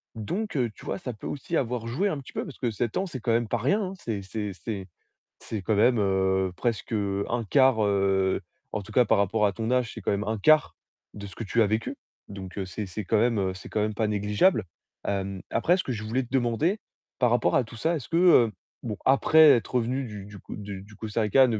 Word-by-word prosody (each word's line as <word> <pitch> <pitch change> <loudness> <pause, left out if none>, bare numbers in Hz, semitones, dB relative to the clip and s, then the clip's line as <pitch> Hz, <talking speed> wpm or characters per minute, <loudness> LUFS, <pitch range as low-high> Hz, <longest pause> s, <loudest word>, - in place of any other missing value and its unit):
Donc, 150 - -3 0.2
tu - - -14
vois, - - -3
ça 135 -9 -5
peut 105 - -12
aussi 155 +4 -3
avoir 120 -2 -2
joué 165 +13 0
un 155 -7 -2
petit 135 - -12
peu, - - -2
parce - - -10
que 125 - 0
7 110 +1 -2
ans, 190 - 0
c'est 140 -7 -6
quand 115 - -1
même 115 0 +1
pas 120 - 0
rien. 185 - 0
C'est 110 -10 -3
c'est 105 +1 -4
c'est 95 +2 -6 0.5
c'est 110 - -5
quand 110 - +1
même, 115 +4 +4
heu, 95 -2 +1
presque 115 0 -2 0.4
1/4, 120 0 +3
heu, 95 -1 +2 0.3
en - - -2
tout 105 +2 -12
cas 125 - +5
par 110 - +3
rapport 105 +2 +2
à 100 - +1
ton 115 +2 -3
âge, 125 -3 +1
c'est - - -8
quand 100 - -1
même 100 +1 -1
1/4 110 +9 +3 0.4
de 100 -1 -8
ce 95 - -11
que 115 - -5
tu 115 +4 +1
as - - +3
vécu. 110 +2 -2 0.3
Donc 95 -1 -8
heu, 100 - -2
c'est 100 +2 -5
c'est 100 +3 -5
quand 110 +4 +2
même, 115 0 +2
heu, 95 -1 0
c'est 95 - -10
quand 105 - -1
même 110 0 0
pas 110 +1 0
négligeable. 105 - +2 0.4
Hem, 95 -1 -2
après, 175 - +3
ce 185 - -2
que 130 - -2
je 110 - -4
voulais 120 +5 0
te 125 - -11
demander 135 - +1 0.4
par 125 -3 +3
rapport 120 - +2
à 130 - +4
tout 115 - -12
ça, 160 +9 0
est-ce 140 - -7
que, 165 - -1
heu, 170 -11 +6 0.3
bon, 110 -3 -4
après 150 +4 +6
être 120 0 +2
revenu 125 +2 0
du 105 -4 -7
du 100 0 -11
Co - - -9
du 100 -2 -7
du 105 +1 -15
Costa 110 0 -3
Rica, 115 +5 +5
110 Hz, 240 wpm, -27 LUFS, 100-125 Hz, 0.5 s, heu